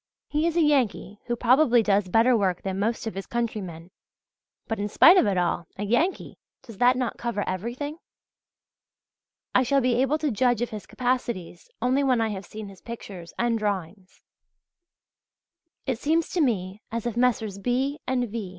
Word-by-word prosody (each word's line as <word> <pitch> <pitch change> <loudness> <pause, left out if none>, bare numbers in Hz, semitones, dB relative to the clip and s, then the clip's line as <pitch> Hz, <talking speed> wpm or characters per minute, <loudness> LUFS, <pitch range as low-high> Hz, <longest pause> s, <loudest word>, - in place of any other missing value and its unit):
He 305 +2 0
is 340 0 -1
a 335 - +5
Yankee 250 -8 +1
who 240 - 0
probably 245 0 +4
does 200 -2 +2
better 225 +6 +4
work 190 -5 0
than 190 0 -3
most 225 +4 -1
of 225 - -3
his 195 0 -6
countrymen; 190 -8 -4 0.7
but 225 - -3
in 205 +1 -2
spite 340 - +7
of 365 - +4
it 195 -2 +1
all 175 -1 0
a 205 - -3
Yankee! 245 - 0 0.2
Does 230 -6 -12
that 250 +1 +5
not 250 -2 -2
cover 235 -4 -2
everything? 240 - -4 1.5
I - - +5
shall 275 +2 +2
be 250 -1 +2
able 270 +3 +2
to 305 -2 -1
judge 240 +1 +2
of 240 - -4
his 215 -2 -7
capacities 240 -9 -3
only 260 +3 +2
when 255 -3 +2
I 225 -1 +1
have 195 -3 -6
seen 215 -1 -8
his 195 -2 -13
pictures 195 -7 -9
and 235 -1 +1
drawings. 195 -2 -4 1.6
It 255 -4 -2
seems 320 +3 +1
to 355 - 0
me 200 -6 -1
as 230 0 -3
if 240 -2 -2
Messrs. 225 -5 +1
B. 260 +7 -1
and 250 -1 0
V. 215 -3 -5
230 Hz, 180 wpm, -25 LUFS, 200-255 Hz, 1.6 s, spite